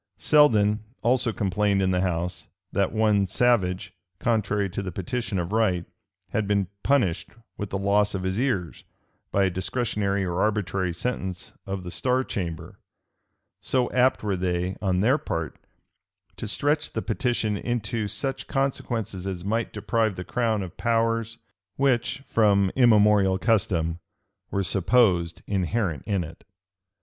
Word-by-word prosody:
Selden 105 -8 +4 0.2
also 120 0 +2
complained 100 0 +1
in 95 -1 +2
the 90 0 +1
house, 85 -2 -2 0.2
that 100 -1 +1
one 105 -3 +2
Savage, 95 -6 +1 0.2
contrary 105 -4 0
to 95 +2 -4
the 95 -2 -4
petition 100 +3 -3
of 85 +1 -2
right, 100 -6 +1 0.4
had 110 -2 -1
been 100 -3 +1
punished 115 -12 +1 0.3
with 105 - -5
the 95 - -2
loss 100 +1 +2
of 95 - -3
his 95 +3 -1
ears, 120 -11 -1 0.5
by 100 - +3
a 95 - +3
discretionary 100 0 -1
or 90 0 -1
arbitrary 95 -4 0
sentence 95 -1 -4
of 95 -1 -4
the 90 - -6
star 130 +5 +1
chamber:[] 85 -9 -5 0.8
so 125 -2 0
apt 130 -1 +3
were 100 -2 0
they, 90 0 -1
on 95 -3 +1
their 130 +8 +3
part, 80 - -4 0.8
to - - -5
stretch 145 +7 0
the - - -2
petition 120 -5 0
into 110 -1 -2
such 135 +5 -3
consequences 120 -8 -2
as 95 -2 -4
might 115 +3 -1
deprive 110 0 0
the 90 - -5
crown 110 -1 0
of 90 - -9
powers 115 -1 0 0.4
which, 135 0 +1
from 100 -5 +3
immemorial 105 -6 +5
custom, 90 -7 +1 0.5
were 100 - -1
supposed 90 -3 +2
inherent 95 - -1
in 100 -4 0
it. 80 0 -11
100 Hz, 140 wpm, -25 LUFS, 95-115 Hz, 0.8 s, immemorial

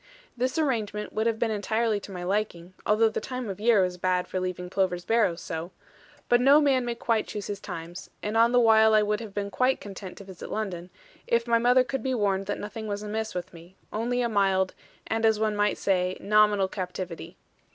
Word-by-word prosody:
This 255 +3 -1
arrangement 220 -9 -1
would 220 +1 0
have 225 -1 0
been 225 0 0
entirely 220 +1 0
to 200 - -11
my 180 -2 -6
liking, 185 -2 -2
although 215 +2 +4
the 220 - -3
time 250 -2 -5
of 195 -1 -5
year 220 -3 +4
was 180 -1 -3
bad 180 0 0
for 185 - -3
leaving 180 -1 -4
Plover's 180 -1 -1
Barrows 215 -7 +2
so; 165 +1 -5 0.6
but 240 0 +4
no 280 +3 +7
man 275 -4 +3
may 240 -1 -2
quite 230 -2 0
choose 205 -2 -5
his 205 -1 -4
times, 175 -3 -8
and 210 +1 -2
on 230 +1 +5
the 245 - +5
while 220 -1 +6
I 215 - +5
would 210 0 0
have 220 -4 -9
been 200 -1 -3
quite 255 +4 +2
content 195 -2 -9
to - - -9
visit 190 -2 -10
London, 185 -5 -4 0.4
if 235 0 +2
my 235 -1 +3
mother 250 +2 +5
could 270 +1 -3
be 260 -1 -1
warned 195 -3 0
that 205 - -2
nothing 215 +1 -6
was 205 0 -3
amiss 220 0 -3
with 180 -1 -5
me, 170 +2 -14 0.2
only 245 +3 0
a - - +1
mild, 195 -3 +2 0.3
and 225 0 -2
as 220 -1 +3
one 215 -1 +1
might 205 0 +1
say, 185 -1 0
nominal 210 -2 +3
captivity. 180 -2 -6
210 Hz, 215 wpm, -27 LUFS, 190-230 Hz, 0.6 s, no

